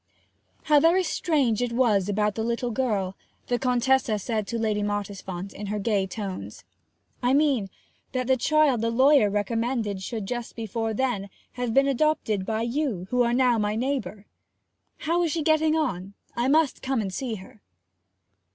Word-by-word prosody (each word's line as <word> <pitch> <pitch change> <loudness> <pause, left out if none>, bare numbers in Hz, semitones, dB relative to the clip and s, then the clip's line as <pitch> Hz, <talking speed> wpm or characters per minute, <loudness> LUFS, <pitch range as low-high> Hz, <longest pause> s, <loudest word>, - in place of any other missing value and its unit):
'How 300 -1 +5
very 340 +5 +4
strange 295 - +1
it 245 -1 -1
was 215 -6 +2
about 210 +1 +1
the 220 - -3
little 235 +1 -1
girl!' 210 -6 -1 0.3
the 245 -1 +1
Contessa 250 -2 +2
said 215 0 -2
to 235 - -3
Lady 215 -2 0
Mottisfont, 200 -2 -4
in 205 - -7
her 210 +1 -2
gay 200 -2 0
tones. 185 - -6 0.6
'I 250 +1 +2
mean, 275 -9 +2 0.4
that 255 -1 -1
the 260 +1 +3
child 280 -2 +2
the 230 - +1
lawyer 260 -1 +5
recommended 215 0 -1
should, 220 +1 -4
just 240 +2 -5
before 225 0 -3
then, 225 -6 -1 0.2
have 245 -2 -3
been 275 0 +5
adopted 265 -8 0
by 220 0 -1
you, 235 - -2
who 250 0 +2
are 235 -1 +2
now 245 -2 +3
my 210 0 0
neighbour. 245 -4 -3 0.8
How 335 +3 +1
is 335 -3 +1
she 325 - -1
getting 315 0 +3
on? 200 - -2 0.2
I 240 +2 0
must 305 0 +2
come 265 -2 -1
and 195 -3 -3
see 250 -2 -3
her.' 200 +1 -13
235 Hz, 170 wpm, -25 LUFS, 205-265 Hz, 0.8 s, How